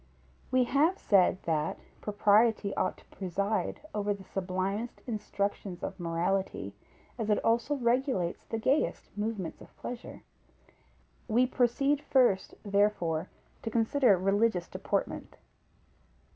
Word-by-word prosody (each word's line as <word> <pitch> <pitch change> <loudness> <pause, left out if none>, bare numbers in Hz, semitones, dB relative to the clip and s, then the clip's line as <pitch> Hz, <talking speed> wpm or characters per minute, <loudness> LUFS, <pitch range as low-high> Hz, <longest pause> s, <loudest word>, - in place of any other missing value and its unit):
_ - - -31 0.5
We 255 0 +4
have 300 +9 +2
said, 190 -2 +3
that 155 -2 0 0.2
propriety 210 0 +3
ought 185 - 0
to - - -19
preside 200 - -2
over 205 -1 0
the 195 - -12
sublimest 190 +4 -3
instructions 200 -4 -3
of 190 0 -4
morality, 175 +3 -1 0.5
as 220 -1 -2
it 210 - +4
also 235 +6 +2
regulates 245 -8 0
the 225 - -4
gayest 260 +1 0
movements 210 -5 -3
of - - -15
pleasure. 245 0 -7 1.0
We 245 +2 +4
proceed 260 +3 +2
first, 250 -9 +2
therefore, 200 -5 +1 0.3
to - - -3
consider 230 -1 +3
religious 195 -1 +2
deportment. - - -3
210 Hz, 115 wpm, -30 LUFS, 190-240 Hz, 1.0 s, We